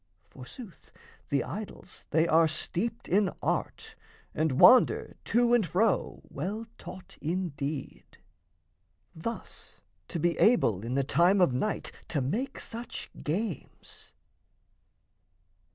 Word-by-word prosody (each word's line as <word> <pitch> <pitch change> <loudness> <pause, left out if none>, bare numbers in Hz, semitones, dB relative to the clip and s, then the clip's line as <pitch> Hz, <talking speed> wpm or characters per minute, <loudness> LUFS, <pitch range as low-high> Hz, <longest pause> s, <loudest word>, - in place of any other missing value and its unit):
Forsooth, 170 - -12 0.4
the 140 -3 +1
idols 210 +1 -8
they 160 +2 +3
are 165 0 +5
steeped 195 +8 -3
in 200 +1 +3
art, - - -2 0.4
And 155 -4 0
wander 255 - +6
to 240 0 +3
and 240 -3 +5
fro 195 +4 0
well 200 +10 -4
taught 180 +1 -11
indeed, 155 -4 -4 1.0
Thus 230 +9 -7 0.3
to 170 - -4
be 170 +1 +1
able 115 - +4
in 120 +3 -3
the 140 - +2
time 175 +8 +3
of 175 -8 +4
night 210 +12 -2 0.2
To 150 - -1
make 245 - -2
such 230 +1 -7
games! 180 - -5
175 Hz, 110 wpm, -29 LUFS, 150-220 Hz, 1.0 s, wander